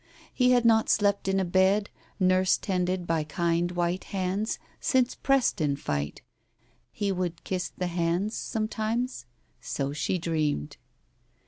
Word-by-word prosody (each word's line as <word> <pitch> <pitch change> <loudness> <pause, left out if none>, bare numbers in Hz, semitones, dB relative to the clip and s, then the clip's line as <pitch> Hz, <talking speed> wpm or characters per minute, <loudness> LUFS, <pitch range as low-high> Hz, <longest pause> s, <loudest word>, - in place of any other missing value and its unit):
He 250 -1 +3
had 245 -1 +4
not 225 -1 +4
slept 200 -2 +2
in 195 0 +2
a 190 - +1
bed, 190 +3 +2 0.3
nurse 185 0 +4
tended 180 -1 -1
by 165 -2 0
kind 170 +2 0
white 175 +1 -1
hands, 195 +3 -2 0.2
since 255 -2 +2
Preston 205 - +1
fight.... 75 - -3 0.7
He 200 -1 -1
would 180 -3 -3
kiss 185 -1 -2
the 180 - -1
hands 175 +4 0
sometimes?... 220 - -2 0.3
So 140 0 -3
she 150 +5 -1
dreamed. 155 - -1
185 Hz, 130 wpm, -27 LUFS, 170-210 Hz, 0.7 s, had